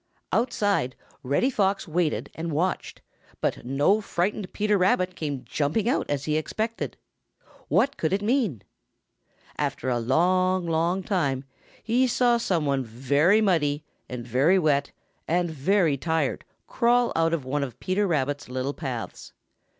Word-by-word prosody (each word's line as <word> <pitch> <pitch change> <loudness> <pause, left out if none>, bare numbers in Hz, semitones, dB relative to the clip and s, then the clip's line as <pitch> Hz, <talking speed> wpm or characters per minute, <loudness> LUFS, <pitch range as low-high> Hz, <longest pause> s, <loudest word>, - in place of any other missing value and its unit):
Outside, 205 - +1 0.3
Reddy 145 - +1
Fox 195 -4 0
waited 165 -1 -1
and 165 +1 -4
watched, 175 +5 -2 0.4
but - - -1
no 145 - +2
frightened 190 0 -2
Peter 210 0 +1
Rabbit 185 -1 +2
came 145 -6 -4
jumping 155 +9 0
out 250 - 0
as 145 -1 -1
he 155 0 +1
expected. 220 +8 -3 0.7
What 275 - +2
could 160 - 0
it 200 +2 0
mean? 215 - 0 1.0
After 130 - -1
a 120 -1 +1
long, 185 +8 +2
long 170 +3 0
time 140 -9 0 0.4
he 245 +3 +2
saw 240 -1 +3
some 180 -9 0
one 140 -2 +1
very 140 - +2
muddy 155 -7 +1 0.3
and 125 -2 -6
very 135 +10 +3
wet 145 -5 +1 0.4
and 175 0 +1
very 160 +1 +2
tired 160 -1 -1 0.2
crawl 240 0 +2
out 165 0 +2
of 160 -6 -2
one 140 +2 -1
of 125 -3 -7
Peter 195 +2 0
Rabbit's 145 -5 -1
little 130 +2 -2
paths. 130 -8 -6
165 Hz, 140 wpm, -26 LUFS, 140-200 Hz, 1.0 s, saw